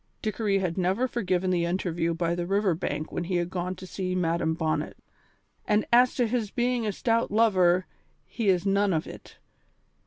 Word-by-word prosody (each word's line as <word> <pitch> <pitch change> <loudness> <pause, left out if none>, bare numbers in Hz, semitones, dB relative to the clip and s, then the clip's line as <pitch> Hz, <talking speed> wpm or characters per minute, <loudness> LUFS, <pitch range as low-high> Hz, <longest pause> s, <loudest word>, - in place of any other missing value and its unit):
Dickory 215 -2 0
had 185 -2 -2
never 190 +8 +1
forgiven 185 -6 -1
the 175 -2 +1
interview 170 -2 -1
by 170 0 0
the 175 0 -3
river 195 -1 +2
bank 155 -2 -4
when 175 - -3
he 180 +1 -2
had 175 0 -1
gone 180 0 -3
to 185 - -10
see 185 0 -3
Madam 165 -2 0
Bonnet. 160 -1 -2 0.7
"And 210 0 +2
as 245 +1 +5
to 245 - +2
his 225 -2 -1
being 240 0 0
a - - +1
stout 230 +3 0
lover, 185 -5 +3 0.4
he 225 -4 -2
is 180 0 +2
none 200 0 +2
of 160 - -1
it. - - -12
185 Hz, 185 wpm, -27 LUFS, 175-215 Hz, 0.7 s, as